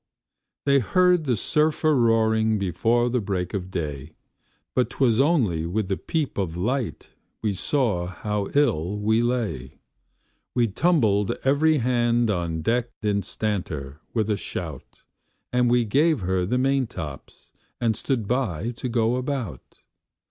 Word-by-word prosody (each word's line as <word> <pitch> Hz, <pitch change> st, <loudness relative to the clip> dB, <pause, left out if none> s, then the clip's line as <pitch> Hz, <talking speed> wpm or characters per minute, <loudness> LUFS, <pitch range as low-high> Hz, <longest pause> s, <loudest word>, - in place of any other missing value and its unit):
They 140 Hz, -1 st, +5 dB
heard 180 Hz, -, +3 dB
the 125 Hz, -4 st, +2 dB
surf 150 Hz, +9 st, +1 dB
a 155 Hz, -1 st, +4 dB
roaring 110 Hz, -3 st, +3 dB
before 115 Hz, +6 st, +1 dB
the 125 Hz, 0 st, 0 dB
break 95 Hz, -2 st, -3 dB
of 95 Hz, -2 st, -3 dB
day; 75 Hz, -4 st, -5 dB, 0.6 s
But 125 Hz, -, +1 dB
'twas 120 Hz, -4 st, +2 dB
only 115 Hz, -, +2 dB
with 100 Hz, +2 st, -2 dB
the 95 Hz, -, +1 dB
peep 150 Hz, -, -2 dB
of 85 Hz, -4 st, -2 dB
light 120 Hz, +6 st, -2 dB, 0.3 s
we 105 Hz, -2 st, +1 dB
saw 100 Hz, -5 st, 0 dB
how 100 Hz, +2 st, -3 dB
ill 100 Hz, -, +2 dB
we 110 Hz, +2 st, +2 dB
lay. 110 Hz, -, -2 dB, 0.8 s
We 120 Hz, -2 st, +2 dB
tumbled 105 Hz, -, +2 dB
every 150 Hz, +3 st, +3 dB
hand 120 Hz, -2 st, +2 dB
on 85 Hz, -4 st, -2 dB
deck 120 Hz, +5 st, +1 dB
instanter, 95 Hz, -8 st, -2 dB
with 110 Hz, -2 st, 0 dB
a 105 Hz, -, +1 dB
shout, 80 Hz, -10 st, -7 dB, 0.5 s
And 125 Hz, -1 st, +3 dB
we 120 Hz, -1 st, +3 dB
gave 145 Hz, +4 st, +2 dB
her 90 Hz, 0 st, 0 dB
the 125 Hz, +5 st, +1 dB
maintops'l, 125 Hz, -, -3 dB, 0.3 s
and 115 Hz, -2 st, +1 dB
stood 120 Hz, -3 st, -2 dB
by 120 Hz, -, -1 dB
to 125 Hz, -, -3 dB
go 115 Hz, +1 st, +1 dB
about. 125 Hz, -, -5 dB
110 Hz, 140 wpm, -24 LUFS, 95-125 Hz, 0.8 s, They